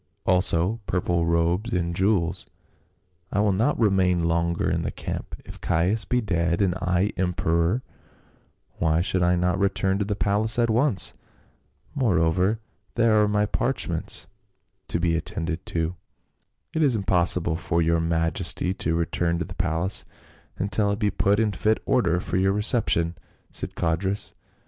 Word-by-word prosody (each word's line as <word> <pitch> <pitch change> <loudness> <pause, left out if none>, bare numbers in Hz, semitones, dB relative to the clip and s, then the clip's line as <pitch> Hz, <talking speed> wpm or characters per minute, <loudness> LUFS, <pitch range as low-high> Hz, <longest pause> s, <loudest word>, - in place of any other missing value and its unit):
also 90 +3 +2
purple 85 -2 0
robes 85 +7 +1
and 85 -1 -1
jewels; 95 -3 0 0.8
I 100 - 0
will 105 0 +3
not 110 +10 +1
remain 95 -5 +2
longer 85 0 0
in - - 0
the - - -2
camp; - - -6
if - - -11
Caius 90 +7 +1
be 125 0 0
dead 85 -5 0
and 95 -3 +2
I 90 +2 0
emperor, 90 +4 0 1.0
why 80 +1 +2
should 95 0 0
I 90 0 +3
not 90 +2 0
return 95 0 +1
to 105 - 0
the 105 0 -2
palace 105 +2 +2
at 115 -1 +2
once? 120 -2 +2 0.4
— - - -38
Moreover 95 - +1 0.4
there 115 -2 +4
are 105 - +3
my 105 0 +1
parchments 105 -7 -1 0.6
to - - -2
be 85 -1 +1
attended 85 -1 -4
to." 80 +1 -2 0.4
" - - -47
It 160 - 0
is 140 -6 +3
impossible 90 -4 +2
for 85 0 -1
your 85 0 +2
majesty 85 +2 +1
to 80 -3 -1
return 85 0 0
to 85 - -3
the 95 - -9
palace 90 +1 0 0.5
until 100 +1 0
it 100 - -1
be 105 -2 0
put 100 +2 +1
in 110 -2 +2
fit 110 +3 +1
order 90 -10 +2
for 90 - -3
your 95 +1 +2
reception," 105 -6 +1 0.4
said - - -4
Codrus. 95 +5 -1
90 Hz, 155 wpm, -24 LUFS, 85-105 Hz, 1.0 s, there